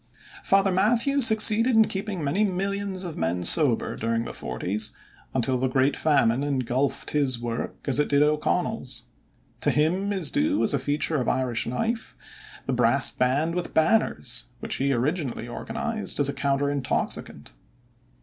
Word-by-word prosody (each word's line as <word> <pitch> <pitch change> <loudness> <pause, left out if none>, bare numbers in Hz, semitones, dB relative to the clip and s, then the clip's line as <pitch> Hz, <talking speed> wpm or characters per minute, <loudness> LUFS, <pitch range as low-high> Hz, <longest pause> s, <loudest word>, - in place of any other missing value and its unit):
Father 195 0 +3
Mathew 235 +9 +2
succeeded 225 +1 +5
in 220 0 +6
keeping 195 -3 -4
many 170 +9 +1
millions 195 0 -2
of 175 -3 -6
men 85 +2 -1
sober 135 - +3
during 115 +1 -2
the - - -7
forties 100 - -3 0.4
until 130 0 +1
the 130 - +1
great 130 +2 +1
Famine 140 -4 +2
engulfed 135 -1 -1
his 135 -5 +1
work 120 -1 -4
as 135 0 +1
it 150 - +2
did 145 0 +4
O'Connell's. 150 - -1 0.6
To - - +1
him 180 +7 +1
is 190 -6 -1
due, 295 +1 +1
as - - +2
a 140 - +1
feature 145 +2 0
of - - -1
Irish 125 -3 -1
life, 225 - -3 0.5
the - - -2
brass - - +2
band 140 +6 0
with 175 0 -4
banners, 160 - +1
which - - -3
he 140 +1 0
originally 135 -1 -1
organized 225 - -3
as 145 - +5
a 140 - -1
counter 140 +1 0
intoxicant. 135 - -3
145 Hz, 155 wpm, -25 LUFS, 130-195 Hz, 0.6 s, in